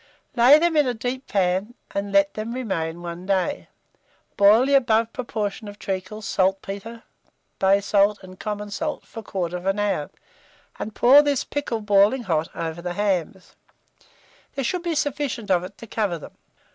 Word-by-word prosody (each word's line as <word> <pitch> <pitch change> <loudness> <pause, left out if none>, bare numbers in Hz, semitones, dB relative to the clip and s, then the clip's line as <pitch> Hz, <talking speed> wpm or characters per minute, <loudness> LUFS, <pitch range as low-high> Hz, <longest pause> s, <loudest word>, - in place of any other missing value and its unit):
Lay 250 +4 +8
them 335 +1 +1
in 295 -3 +4
a 245 - -1
deep 250 +4 -4
pan, 195 +4 0 0.2
and 200 0 -3
let 200 0 +3
them 220 +2 -5
remain 175 -9 -3
one 175 +2 -7
day; 195 +9 0 0.7
boil 210 +5 +6
the 280 - +1
above 230 -4 +3
proportion 215 -3 -4
of 205 0 -9
treacle, 195 +1 -5
saltpetre, 195 +4 -2 0.6
bay 195 +1 +4
salt, 200 +1 +3
and 185 0 -12
common 210 -1 -4
salt 300 +9 -3
for 225 - -9
1/4 185 0 -2
hour, 205 -8 -1 0.7
and 215 - -5
pour 270 +4 +7
this 285 -3 0
pickle 280 -6 -3
boiling 210 +4 +3
hot 165 -5 -1
over 165 0 -4
the 175 0 -4
hams: 190 -2 -2 1.0
there 275 - -2
should 360 +8 -1
be 340 -2 -2
sufficient 280 -7 -2
of 180 -1 +3
it 195 +2 -9
to - - -10
cover 210 -5 -1
them. 155 - -11
205 Hz, 160 wpm, -23 LUFS, 190-240 Hz, 1.0 s, Lay